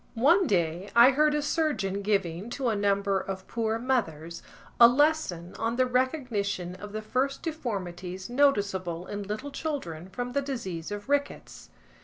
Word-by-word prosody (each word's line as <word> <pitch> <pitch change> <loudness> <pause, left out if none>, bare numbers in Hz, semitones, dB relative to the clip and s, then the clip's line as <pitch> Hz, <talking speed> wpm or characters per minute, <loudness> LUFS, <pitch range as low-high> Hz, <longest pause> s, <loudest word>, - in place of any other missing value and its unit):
One 335 - +4
day, 175 +1 0
I 235 +3 +8
heard 300 +2 +3
a 295 - 0
surgeon 290 - 0
giving, 195 -1 -1
to 260 -3 0
a 220 - 0
number 200 -1 +1
of 190 0 -6
poor 225 -1 -1
mothers, 170 - -2 0.4
a 235 - +11
lesson 245 - +1
on 230 +1 0
the 255 +1 +3
recognition 250 - -1
of 205 +3 -9
the 215 +1 -5
first 265 +5 -1
deformities 190 - -4
noticeable 200 -10 +1
in 205 +1 -5
little 215 +8 -5
children 190 - -4
from 245 +5 -4
the 280 +2 0
disease 190 - -5
of 205 0 -6
rickets. 285 0 -2
215 Hz, 155 wpm, -28 LUFS, 190-265 Hz, 0.4 s, a